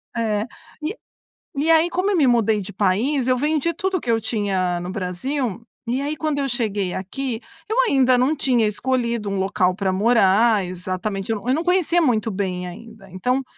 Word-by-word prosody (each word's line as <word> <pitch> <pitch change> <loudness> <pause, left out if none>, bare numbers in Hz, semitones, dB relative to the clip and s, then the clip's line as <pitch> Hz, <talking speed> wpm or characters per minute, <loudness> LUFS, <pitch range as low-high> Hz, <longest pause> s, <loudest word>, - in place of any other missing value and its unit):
É, 215 -2 0 0.4
e 355 +9 -2 0.6
e 300 +4 0
aí, 325 +1 +5
como 365 +3 -1
eu 385 - +2
me 290 - +4
mudei 225 -3 +3
de 200 0 -7
país, 230 +8 +1
eu 255 0 +3
vendi 305 +4 +1
tudo 380 +1 -1
o - - -6
que 240 - -6
eu 225 -1 +3
tinha 195 -5 -1
no 175 +1 -5
Brasil. 220 +5 -3 0.2
E 250 +4 -1
aí, 295 +2 -2
quando 305 -2 -1
eu 275 - 0
cheguei 210 -6 -1
aqui, 230 +5 -4 0.3
eu 445 - -1
ainda 260 -2 +4
não 270 +5 +2
tinha 250 -6 +2
escolhido 235 -1 -1
um 195 - -2
local 185 -1 +1
para 195 -1 0
morar 210 0 +4
exatamente 185 +3 -4
eu - - +1
não 235 - -11
eu 255 - +3
não 320 +4 0
conhecia 350 -1 +2
muito 225 -6 +1
bem 185 -2 -3
ainda, 220 +2 -11
então 250 +9 0
230 Hz, 195 wpm, -22 LUFS, 195-275 Hz, 0.6 s, aí